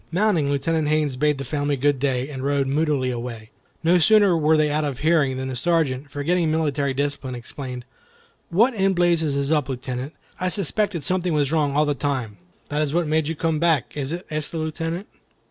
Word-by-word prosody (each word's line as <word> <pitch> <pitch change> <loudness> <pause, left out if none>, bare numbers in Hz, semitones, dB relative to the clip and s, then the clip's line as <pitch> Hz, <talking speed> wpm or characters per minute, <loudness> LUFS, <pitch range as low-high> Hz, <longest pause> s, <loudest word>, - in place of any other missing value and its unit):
Mounting, 175 -5 +2
Lieutenant 150 +2 0
Haines 150 -3 +1
bade 150 +2 +1
the 135 - -4
family 145 +1 -1
good 140 +1 +1
day, 130 -1 0
and 135 -3 -6
rode 140 0 +1
moodily 140 -2 0
away. 115 -2 -6 0.3
No 175 +2 +4
sooner 200 +1 +5
were 155 0 +3
they 150 -1 +2
out 155 +1 0
of 140 -4 -2
hearing 150 -3 +2
than 130 0 -3
the 130 - -4
Sergeant, 145 -2 0
forgetting 160 +4 0
military 145 -3 0
discipline, 140 -2 -2
exclaimed, 125 0 -7 0.6
"What 230 +9 +3
in 195 -3 +2
blazes 170 -4 +2
is 140 +1 -1
up, 150 -4 +1
Lieutenant? 130 +2 -5 0.2
I 185 - 0
suspected 200 -2 -1
something 180 +1 0
was 145 -2 +1
wrong 150 -3 +1
all 150 +1 +4
the 145 - +1
time." 130 -6 -3 0.3
"That 150 0 0
is 150 0 -1
what 175 -1 +2
made 155 0 +1
you 165 - -2
come 160 0 0
back, 165 -2 +1
is 140 -1 -3
it?" 175 +2 -4
asked 155 -1 -2
the 165 - -4
Lieutenant. 165 +4 -3
150 Hz, 200 wpm, -23 LUFS, 140-165 Hz, 0.6 s, sooner